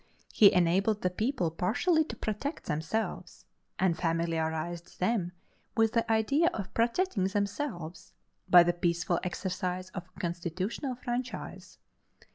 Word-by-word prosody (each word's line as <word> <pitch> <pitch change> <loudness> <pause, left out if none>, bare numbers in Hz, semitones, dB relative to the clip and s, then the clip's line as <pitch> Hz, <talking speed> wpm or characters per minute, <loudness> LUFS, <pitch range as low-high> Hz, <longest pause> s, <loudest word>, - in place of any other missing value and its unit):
He 205 -2 +8
enabled 190 +5 +2
the 180 - +1
people 215 - -1
partially 280 - +2
to - - -7
protect 220 +8 -3
themselves, 160 +9 -3 0.3
and 185 -3 +2
familiarized 165 0 -2
them 185 -2 +1 0.5
with 225 -1 +3
the 230 -1 +1
idea 275 +9 +3
of 195 -3 -5
protecting 235 - +1
themselves, 200 - -3 0.4
by 175 -1 +9
the 175 0 +1
peaceful 175 0 0
exercise 185 0 -3
of 185 -2 -7
a 185 - -18
constitutional 185 - -3
franchise. 245 +1 -5
185 Hz, 120 wpm, -30 LUFS, 175-225 Hz, 0.5 s, by